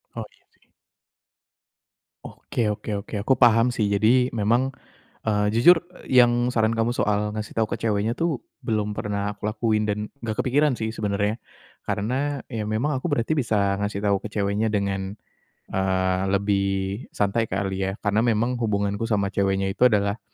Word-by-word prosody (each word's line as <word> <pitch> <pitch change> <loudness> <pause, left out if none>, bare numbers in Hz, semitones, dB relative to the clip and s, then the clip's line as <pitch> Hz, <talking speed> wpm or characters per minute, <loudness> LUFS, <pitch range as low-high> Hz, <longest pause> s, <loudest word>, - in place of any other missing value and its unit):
Oh, - - -4
iya, - - -30
sih. - - -35 1.5
Oke 110 -3 -2
oke 105 -1 -4
oke, - - -8
aku 130 +6 +2
paham 115 -1 +5
sih. 110 - 0
Jadi 120 +5 +3
memang, 120 +5 +1 0.6
eee, 105 -1 +2
jujur 165 +10 +6 0.2
yang 120 -1 +4
saran 110 0 +3
kamu 115 +2 0
soal 105 0 0
ngasih 110 0 -5
tau 110 -1 0
ke - - -3
ceweknya 110 +1 0
tuh, 165 -6 -1 0.2
belum 105 -2 -1
pernah 105 0 -3
aku - - -25
lakuin 110 -1 0
dan 105 0 -2 0.2
enggak 110 -2 -3
kepikiran 145 +3 +2
sih, 110 0 -3
sebenarnya. 105 +1 0 0.5
Karena, 130 +8 -1
ya 110 -3 -4
memang 110 +8 -1
aku 145 +5 -3
berarti 145 +4 +1
bisa 105 -7 +1
ngasih 100 0 -3
tahu 100 -1 +1
ke 105 - -6
ceweknya 105 +1 0
dengan, 100 0 -2 0.5
eee, 95 -1 +1
lebih 100 0 +1 0.5
santai 105 +3 +1
kali 95 0 -2
ya. - - -1
Karena 105 +1 +2
memang 120 +2 +1
hubunganku 100 0 -1
sama 100 -3 0
ceweknya 95 0 0
itu 125 +5 +4
adalah, 100 -1 +1
105 Hz, 160 wpm, -24 LUFS, 100-115 Hz, 1.5 s, jujur